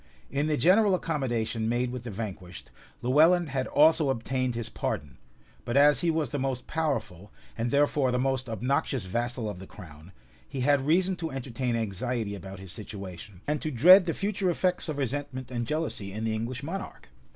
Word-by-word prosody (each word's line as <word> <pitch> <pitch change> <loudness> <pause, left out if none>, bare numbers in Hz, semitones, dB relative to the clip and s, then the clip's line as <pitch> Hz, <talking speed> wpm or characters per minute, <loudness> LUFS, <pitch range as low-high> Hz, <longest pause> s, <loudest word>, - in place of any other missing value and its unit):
In 145 +2 0
the 150 -1 +1
general 195 +4 +5
accommodation 120 -9 -1
made 120 +1 0
with 125 -1 -6
the - - -4
vanquished, 90 - -7 0.3
Lewellyn 160 +8 +5
had 130 -1 -2
also 155 -1 +4
obtained 130 0 -1
his 115 -1 -3
pardon; 70 -4 -4 0.4
but 120 +3 -1
as 145 +1 +6
he 170 - +1
was 160 -5 0
the 145 - -2
most 130 -1 -2
powerful, 135 - -3 0.2
and 115 +1 -1
therefore 140 0 +2
the 125 - +1
most 130 -1 -1
obnoxious 125 0 -1
vassal 120 +4 -2
of 105 -4 -5
the 95 - -10
crown, 80 +1 -13 0.4
he 135 - -4
had 140 +1 +2
reason 185 +4 +3
to 165 -2 -3
entertain 130 -2 -3
anxiety 110 0 -2
about 95 -1 -8
his 95 -2 -9
situation, 95 -2 -9
and 150 0 -1
to 155 - -2
dread 175 - +7
the 165 - -1
future 195 -2 -1
effects 180 0 0
of 150 - -3
resentment 135 -1 -3
and 120 -2 -2
jealousy 150 -10 -2
in 110 +3 -5
the 110 -1 0
English 120 +4 -3
monarch. 180 - -6
130 Hz, 185 wpm, -28 LUFS, 110-150 Hz, 0.4 s, dread